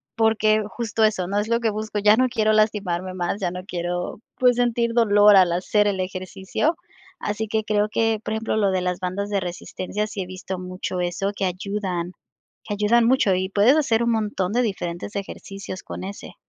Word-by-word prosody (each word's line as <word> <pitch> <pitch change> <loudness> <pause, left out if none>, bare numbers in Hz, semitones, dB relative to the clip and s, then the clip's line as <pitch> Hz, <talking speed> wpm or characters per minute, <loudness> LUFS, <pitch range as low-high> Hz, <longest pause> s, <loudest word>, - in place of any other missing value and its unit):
porque, 220 -1 +3
justo 225 -1 -1
eso, 215 -4 +2
¿no?, 200 +2 0
es 210 - -2
lo 230 +1 +2
que 230 -2 +1
busco, 215 0 -4
ya 210 +1 +5
no 255 +1 +4
quiero 215 -2 +2
lastimarme 190 -4 0
más, 180 +2 -2
ya 180 - +1
no 180 +1 -7
quiero, 175 +2 -4 0.2
pues, 250 -1 +4
sentir 235 -1 +1
dolor 210 -3 +6
al 185 -3 +6
hacer 205 +4 +2
el 195 -2 -1
ejercicio, 185 - -2 0.4
así 210 +1 -3
que 220 +1 -1
creo 210 0 +1
que, 225 0 +1
por 215 - -3
ejemplo, 220 0 -2
lo 210 -2 +2
de 185 -1 0
las 180 0 -2
bandas 185 +3 -3
de 200 - +1
resistencia, 185 +3 -4
sí 215 -2 -5
he 185 - -5
visto 185 0 -6
mucho 185 0 -4
eso 180 +3 -1
que 195 - -1
ayudan 185 -1 -3 0.5
que 205 - -3
ayudan 220 +3 +3
mucho 235 -5 +3
y 185 +1 -1
puedes 210 +8 +4
hacer 235 -7 +2
un 235 - +2
montón 210 -4 -1
de 245 - +3
diferentes 185 -3 -3
ejercicios 195 -1 -7
con - - -7
ese. 200 +1 -8
205 Hz, 200 wpm, -23 LUFS, 185-220 Hz, 0.5 s, dolor